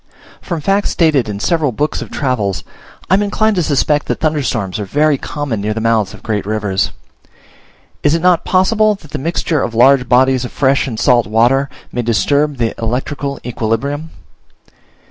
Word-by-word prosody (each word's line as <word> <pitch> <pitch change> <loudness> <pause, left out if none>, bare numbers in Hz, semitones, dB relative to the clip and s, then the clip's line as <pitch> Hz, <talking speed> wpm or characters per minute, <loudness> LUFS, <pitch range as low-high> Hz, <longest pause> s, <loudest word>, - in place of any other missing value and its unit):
From 170 -4 -4
facts 195 +5 +1
stated 150 -9 +2
in 100 -1 -4
several 155 +2 +1
books 145 +7 -2
of - - -7
travels, 115 - -1 0.5
I - - +6
am 195 - +4
inclined 215 +1 +1
to - - +3
suspect 150 -1 +1
that - - -2
thunderstorms 125 - -1
are - - -2
very 145 +7 +1
common 140 -8 -4
near 105 +1 -2
the - - -2
mouths 110 -3 +1
of - - -17
great 105 -3 -2
rivers. 100 -2 -1 1.1
Is 150 +2 +2
it 165 - -1
not 180 -2 +4
possible 210 +3 +2
that 155 -7 -16
the 150 - -4
mixture 160 0 -1
of 115 - -3
large 125 +1 +4
bodies 130 +1 +3
of 125 - -6
fresh 135 0 +1
and 115 -4 -5
salt 120 -3 +3
water 120 +6 +2 0.2
may 120 - -2
disturb 140 +6 +1
the 115 -2 -1
electrical 135 +4 -3
equilibrium? 125 +7 -2
135 Hz, 175 wpm, -16 LUFS, 115-155 Hz, 1.1 s, I